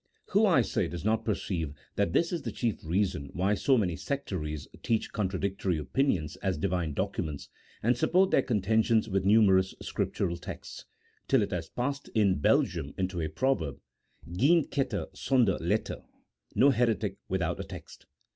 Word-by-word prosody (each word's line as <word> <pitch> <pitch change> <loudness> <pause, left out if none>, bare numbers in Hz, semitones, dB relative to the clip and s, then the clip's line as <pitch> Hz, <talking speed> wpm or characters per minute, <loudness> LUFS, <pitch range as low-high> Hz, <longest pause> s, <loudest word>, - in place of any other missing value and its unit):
Who, - - +4
I - - +5
say, - - -1
does 85 +2 -6
not 110 +1 +1
perceive 85 -8 -2 0.2
that 85 - +1
this 170 - +1
is 170 - -2
the 115 - -4
chief 110 +1 -2
reason 85 -4 -1
why 95 +3 +1
so 130 +5 +3
many 90 -7 0
sectaries 90 - -4
teach 115 -2 0
contradictory 95 -3 -1
opinions 80 - 0
as 95 -4 -1
Divine 90 -3 -1
documents, 85 -6 -3 0.3
and 120 +3 +3
support 185 +9 +3
their - - +5
contentions 110 -1 +2
with 95 -2 0
numerous 95 -3 +4
Scriptural 85 0 -2
texts, - - -8 0.4
till 135 -5 +4
it - - -4
has 85 -3 -3
passed 140 +3 -3
in 100 -6 +3
Belgium 70 0 +1
into 95 -2 -2
a 80 - -2
proverb, 95 - -1 0.5
geen 145 - +4
better 130 -7 -1
sonder 115 -1 +2
letter - - -1 0.3
— 60 0 -36
no 140 +3 +6
heretic 115 -4 0
without - - -1
a - - -2
text - - -11
100 Hz, 160 wpm, -29 LUFS, 85-120 Hz, 0.5 s, no